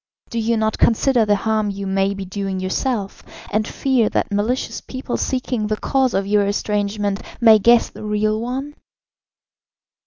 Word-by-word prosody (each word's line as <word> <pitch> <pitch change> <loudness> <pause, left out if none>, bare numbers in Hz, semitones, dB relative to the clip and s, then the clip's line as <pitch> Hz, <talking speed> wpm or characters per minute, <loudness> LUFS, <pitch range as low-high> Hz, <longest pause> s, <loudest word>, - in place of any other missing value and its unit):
Do 235 - -2
you 230 +1 +1
not 220 0 0
consider 235 0 +3
the 205 - +4
harm 215 +1 0
you 200 0 -5
may 195 +1 0
be 195 -1 -6
doing 195 0 -4
yourself, 195 +2 -2 0.3
and 215 +1 0
fear 255 -5 +1
that - - -1
malicious 215 +6 -1
people, 260 -1 -5
seeking 250 -4 -1
the 215 0 -1
cause 265 -2 +1
of 195 0 0
your 205 0 +2
estrangement, 205 0 -1 0.2
may 225 -2 +7
guess 235 +3 +5
the - - -11
real 215 +1 0
one?" 265 +5 -4
215 Hz, 160 wpm, -20 LUFS, 200-235 Hz, 0.3 s, may